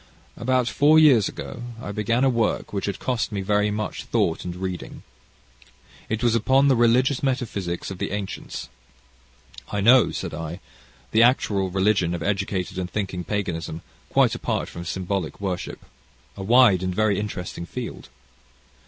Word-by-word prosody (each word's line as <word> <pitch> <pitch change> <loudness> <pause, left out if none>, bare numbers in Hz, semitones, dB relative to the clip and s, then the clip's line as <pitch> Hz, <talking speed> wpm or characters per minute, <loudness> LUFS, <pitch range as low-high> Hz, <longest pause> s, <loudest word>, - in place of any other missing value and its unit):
"About 125 0 +1
four 150 +5 +4
years 135 -10 +6
ago 125 - -8 0.2
I 110 - -6
began 110 +4 0
a - - +5
work, 115 -3 -1
which 100 -1 -2
had 100 - -2
cost 125 -3 -2
me 100 -2 -2
very 105 +1 +1
much 105 0 -4
thought 80 - 0
and 90 -1 -5
reading. 90 -1 -6 1.1
It 110 +2 -2
was 120 -2 +3
upon 130 +5 +3
the 135 - +5
religious 125 +3 +3
metaphysics 100 -11 -2
of 95 - -7
the - - -2
ancients." 100 -10 -5 1.0
"I 105 - -1
know," 120 +5 +6
said - - -5
I, 80 +3 -5 0.5
"the 110 - +4
actual 105 -6 +3
religion 95 -2 +1
of 85 - -5
educated 95 -2 -2
and 90 -1 -3
thinking 95 -3 -3
paganism, 85 -5 -3 0.3
quite - - +3
apart - - -2
from 85 - -8
symbolic 95 0 -3
worship? 95 -3 -4 0.5
A - - -7
wide 110 -2 +5
and 95 -1 -2
very 105 -1 +2
interesting 90 -4 -5
field." 125 - -7
105 Hz, 155 wpm, -24 LUFS, 95-120 Hz, 1.1 s, years